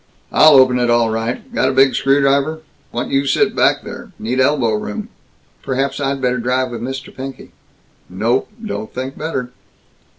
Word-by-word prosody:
"I'll 155 0 +7
open 130 -1 +5
it 120 -1 +1
all 120 -1 +3
right! 115 +2 -4
Got 130 - +2
a - - -1
big 135 0 +4
screwdriver? 140 +4 +2 0.3
Want 120 - -3
you 135 +1 +1
sit 135 - +2
back - - +2
there. - - -9
Need 125 +4 -2
elbow 130 -4 +2
room." 105 -1 -4 0.5
"Perhaps 135 +2 -2
I'd 140 -1 -1
better 125 -1 0
drive 125 +1 0
with 120 - -6
Mr. 135 +2 -6
Pinky." 135 0 -8 0.6
"Nope. 110 +8 0 0.2
Don't 110 - -5
think 130 +2 -5
better." 135 -6 -4
130 Hz, 165 wpm, -18 LUFS, 120-135 Hz, 0.6 s, I'll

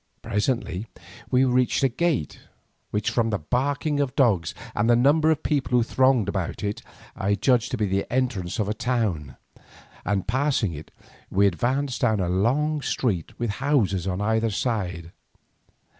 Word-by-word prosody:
Presently 105 -2 -1 0.4
we 130 +1 +4
reached 125 +1 +2
a - - +6
gate, 135 - -1 0.5
which, 105 0 -1
from 115 -2 +1
the 105 - 0
barking 140 - -1
of 140 -2 -1
dogs 105 - +2 0.2
and 110 +3 +1
the 120 - +6
numbers 150 +6 +4
of 155 - -8
people 135 -4 +1
who 120 - +4
thronged 130 -3 +2
about 95 -2 -3
it, 105 0 -3 0.3
I 100 +1 0
judged 120 +1 +2
to 125 - -2
be 105 - +1
the 95 0 -2
entrance 120 -9 -1
to 110 - 0
a 105 - 0
town, 105 - -2 0.7
and 100 -2 -1
passing 130 - +1
it, 75 +1 -9 0.4
we 100 +2 +3
advanced 125 +7 0
down 110 -4 +2
a 90 -2 0
long 140 +11 +1
street 100 - -2
with 120 -3 -1
houses 105 - +1
on 95 +1 -2
either 110 +2 +1
side. 95 -7 -2
115 Hz, 160 wpm, -24 LUFS, 100-130 Hz, 0.7 s, a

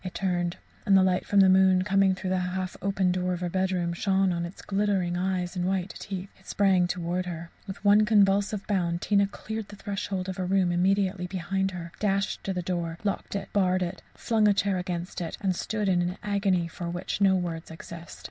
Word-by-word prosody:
It 185 - -6
turned, 175 -2 -1 0.3
and 195 -1 +5
the 190 - +5
light 185 -1 +1
from 200 -1 +5
the 190 - +7
moon, 185 0 +5
coming 195 -1 +3
through 185 0 -4
the 185 - +2
half 180 0 -3
open 195 -1 +1
door 180 0 0
of 175 - -3
her 175 -1 -2
bedroom, 185 -2 0
shone 190 +1 +1
on 170 0 -2
its 175 - -12
glittering 195 -3 0
eyes 180 0 -1
and 180 - -1
white 190 0 -1
teeth. 195 0 -6
It 190 - -22
sprang 190 -3 +3
towards 180 +1 -2
her. 170 -1 -6 0.2
With 195 +1 -8
one 205 +1 +6
convulsive 205 -1 +3
bound 175 -4 0
Tina 200 -1 +3
cleared 220 +1 -6
the 205 - -11
threshold 195 -2 -4
of 190 0 -5
a - - 0
room 185 -1 +2
immediately 185 +1 +1
behind 190 +1 -1
her, 170 -2 -7
dashed 195 -1 0
the 180 -2 -2
door 170 -2 -2
to 210 - -3
locked 200 - -3
it 200 -1 -5
barred 185 -2 +2
it 175 - -5
flung 220 -2 +2
a 205 - +4
chair 195 -2 +1
against 180 -1 -4
it; 165 - -4
and 190 -3 0
stood 210 +3 -2
in 180 -2 +3
an 180 +1 -2
agony, 195 -4 +1
for 170 +1 -6
which 175 +3 -4
no 195 -1 +5
words 170 -2 -3
exist. 165 +1 -10
185 Hz, 215 wpm, -27 LUFS, 175-195 Hz, 0.3 s, the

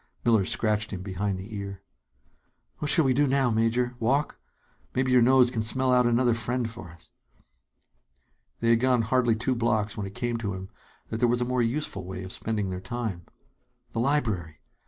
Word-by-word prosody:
Miller 110 -5 +4
scratched 110 +1 0
him 95 -2 -6
behind 95 0 -2
the 100 +4 -8
ear. 100 -1 -6 1.0
"What 150 - -1
shall 160 -1 +6
we 130 - +3
do 145 +3 +3
now, 135 -2 +2
Major? 115 +2 +1
Walk? 135 +6 0 0.6
Maybe 130 0 +1
your 125 -1 +6
nose 125 0 +5
can 115 - -2
smell 130 +4 +1
out 125 -1 +4
another 120 0 +3
friend 120 +1 -1
for 115 -6 -9
us." 85 0 -17 1.5
They 115 0 +3
had 115 - +4
gone 125 -1 +2
hardly 120 0 +2
two 125 +4 0
blocks 110 -3 0
when 100 -2 -4
it 95 - -11
came 120 -1 -1
to 105 -4 -3
him 95 0 -8 0.4
that 110 - -3
there 120 +1 +2
was 120 +1 +1
a - - +1
more 125 0 0
useful 115 -4 -1
way 95 +1 -6
of 95 - -7
spending 105 -3 -2
their 90 0 -5
time. 95 -4 -5 0.6
The - - -3
library! 110 - 0
115 Hz, 190 wpm, -27 LUFS, 100-125 Hz, 1.5 s, shall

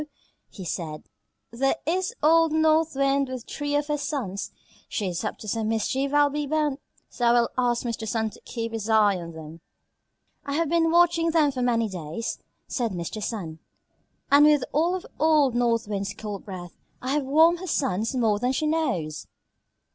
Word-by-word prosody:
he 190 - -9
said, 155 -2 -4 0.5
"there 270 +5 +1
is 365 +3 0
old 325 +1 +5
North 315 0 +3
Wind 275 0 +2
with 255 -2 -6
three 290 0 -3
of 290 0 +1
her 295 0 -1
sons. 255 - -3 0.4
She 205 - -2
is 175 +2 -3
up 215 - -3
to 215 - -10
some 220 +1 -1
mischief, 260 +5 0
I'll 290 0 +4
be 295 0 -2
bound; 300 -2 0 0.3
so 245 - -3
I - - +6
will 240 -1 +3
ask 245 -1 +1
Mr. 230 -2 -3
Sun 220 0 -1
to - - -16
keep 230 -1 -5
his 225 -1 -4
eye 210 -3 +4
on 170 -1 -7
them." 160 +1 -10 0.8
"I 280 - -4
have 325 +1 0
been 330 0 +3
watching 335 0 +4
them 315 -3 +3
for 255 -2 -4
many 230 -2 +2
days," 180 +3 -5 0.3
said 235 -5 -2
Mr. 175 +5 -5
Sun, 175 -8 -4 0.7
"and 290 +1 +7
with 295 -3 +4
all 335 +5 +2
of 370 - -6
old 300 -4 +4
North 235 -2 +1
Wind's 200 -1 -3
cold 210 -3 -6
breath 180 -3 -8 0.3
I 255 - -3
have 295 0 +1
warmed 320 +5 +4
her 370 - -7
sons 225 - 0
more 220 -4 +2
than 250 +3 0
she 305 - -1
knows." 190 - -1
250 Hz, 185 wpm, -25 LUFS, 210-300 Hz, 0.8 s, and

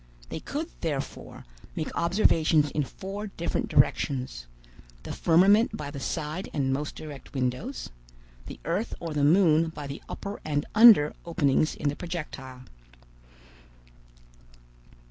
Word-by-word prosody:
They - - -5
could, - - -4
therefore, - - -5 0.3
make 155 - -4
observations 165 -4 +3
in 150 - 0
four 195 +8 -6
different 170 -4 -3
directions; 125 - +1 0.6
the - - -6
firmament 195 +7 +4
by 145 -1 -6
the 140 - -7
side 155 +7 -4
and 135 -2 +1
most 145 +2 -3
direct 145 -2 -10
windows, 130 - -3 0.6
the - - -9
earth 180 +8 -2
or 165 -2 -5
the 145 -1 0
moon 165 0 +5
by 150 -2 -8
the 140 +1 -7
upper 200 +1 -6
and 145 -2 -1
under 215 -10 +8
openings 155 -3 +1
in 150 - -3
the 145 - -3
projectile. 145 -7 -7
155 Hz, 125 wpm, -27 LUFS, 145-180 Hz, 0.6 s, under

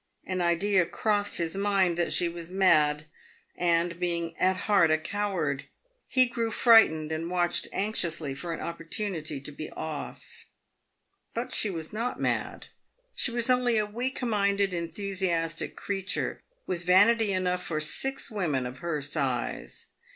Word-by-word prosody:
An 185 -1 -2
idea 180 +3 +3
crossed 205 -2 0
his 165 +1 -1
mind 195 -3 +2
that 175 0 0
she 175 - +2
was 170 0 -7
mad, 155 -6 +3 0.5
and, 170 0 +1
being 170 -2 -2
at 185 +1 +2
heart 200 -6 +4
a 155 - +4
coward, 165 -5 -2 0.4
he 255 -1 +4
grew 235 -1 -2
frightened 210 -10 +5
and 160 +2 -3
watched 175 -1 +1
anxiously 170 -8 -1
for 170 +5 -6
an 165 - -4
opportunity 165 -3 -3
to 140 +2 -9
be 155 +1 -7
off. 155 -2 -7 0.9
But 245 +2 -3
she 215 - +1
was 165 -2 -6
not 235 +3 -2
mad; - - -2 0.5
she - - +1
was 235 -1 -1
only 250 -2 +3
a 210 - +2
weak 245 +6 -3
minded, 200 -4 +1
enthusiastic 170 -2 -2
creature, 195 -1 -3 0.2
with 175 -2 -3
vanity 205 +4 +5
enough 180 -1 0
for 155 -2 -2
six 270 - -1
women 155 -11 -1
of 125 +1 -7
her 160 -4 -3
size. 135 -3 -3
180 Hz, 145 wpm, -28 LUFS, 165-205 Hz, 0.9 s, frightened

